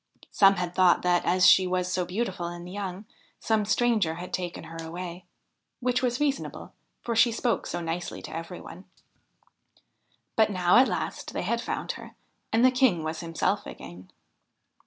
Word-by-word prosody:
Some 195 -1 +6
had 180 -1 -3
thought 185 -2 +4
that, 175 -1 +2
as 185 +1 +3
she 185 0 +7
was 180 0 -1
so 180 - 0
beautiful 185 -2 -3
and 175 0 -7
young, 195 +1 -5 0.3
some 220 -2 +1
stranger 215 -6 +2
had 180 +2 -8
taken 175 -1 -3
her 165 0 -8
away: 175 +2 -7 0.5
which 250 0 0
was 245 -1 0
reasonable, 285 -2 -2 0.3
for 235 - -2
she 235 +1 +5
spoke 230 +1 -1
so 175 - -3
nicely 165 +1 -4
to - - -7
every 165 +2 -6
one. 185 +3 -11 1.5
But 220 -1 +4
now 180 0 +3
at 260 +2 +6
last - - -4
they - - -2
had - - -1
found - - -3
her, - - -11 0.4
and 230 +3 +4
the 255 - +6
King 250 -10 +2
was 160 +1 -3
himself 165 -1 -1
again. 90 +1 -10
185 Hz, 170 wpm, -27 LUFS, 175-225 Hz, 1.5 s, she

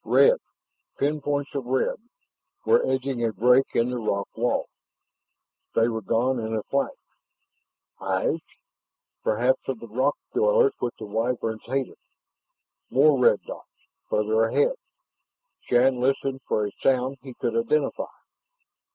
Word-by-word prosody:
Red - - +5 0.6
pinpoints 145 0 -1
of 140 -3 -3
red 130 +1 0 0.7
were 465 - +4
edging 130 -2 -1
a 115 - +1
break 125 +6 +4
in 120 +2 +2
the 125 - -2
rock 100 -3 -1
wall. 120 +2 0 1.1
They 115 - +4
were 115 -1 -3
gone 120 +6 +1
in 110 0 -3
a 110 - -2
flash. 140 0 0 1.1
Eyes? - - -1 0.8
Perhaps 120 +6 +1
of 130 -4 -2
the 115 - -9
rock 130 +6 0 0.2
dwellers 465 +1 +4
which 120 - -2
the 110 - -7
Wyverns 110 +1 -2
hated? 135 +2 -3 0.9
More 140 +1 +4
red 115 -4 +4
dots, - - -9 0.4
farther 110 +1 +2
ahead. 475 - +2 1.0
Shann 125 +1 +4
listened 135 +1 0
for 105 - +1
a 100 - -4
sound 130 0 +1
he 130 -2 -10
could 115 - -2
identify. 135 +5 0
125 Hz, 130 wpm, -25 LUFS, 115-135 Hz, 1.1 s, Red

